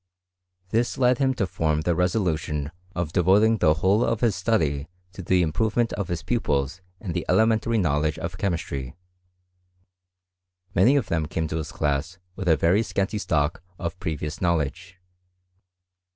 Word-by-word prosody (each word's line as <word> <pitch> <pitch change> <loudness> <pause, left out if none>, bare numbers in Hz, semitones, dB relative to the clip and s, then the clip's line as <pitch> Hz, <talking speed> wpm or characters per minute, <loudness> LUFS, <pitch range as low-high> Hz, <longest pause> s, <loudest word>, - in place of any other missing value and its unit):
This 115 +5 0
led 125 -1 +3
him 135 -1 +2
to 105 - 0
torto 80 -3 -1
the 85 - +1
resolution 80 -5 -1 0.2
of 85 -2 -3
devoting 100 +5 +4
the 75 -3 +4
whole 95 +7 +2
of 115 - 0
his 115 -5 +2
study 80 -8 0 0.3
to 95 - -8
ibe 90 0 +2
improvement 110 +8 0
of 100 -3 -3
his 85 -2 -3
pupils 75 - -1 0.2
in 95 -6 -5
the - - -2
elementary 110 +1 +3
knowledge 75 -4 +1
of 85 +2 -5
chemistry. 70 -9 -3 1.8
Many 100 +10 +5
of 140 -6 +2
them 80 -2 0
came 80 0 -2
to 80 - -2
his 80 -1 -4
class 75 +4 -1 0.2
with 95 - -5
a 80 -2 +5
very 85 +8 +3
scanty 105 -1 -1
stock 80 -3 0 0.2
of 85 +2 -5
previous 75 -1 -4
knowledge. 85 +1 -1
90 Hz, 150 wpm, -25 LUFS, 80-105 Hz, 1.8 s, Many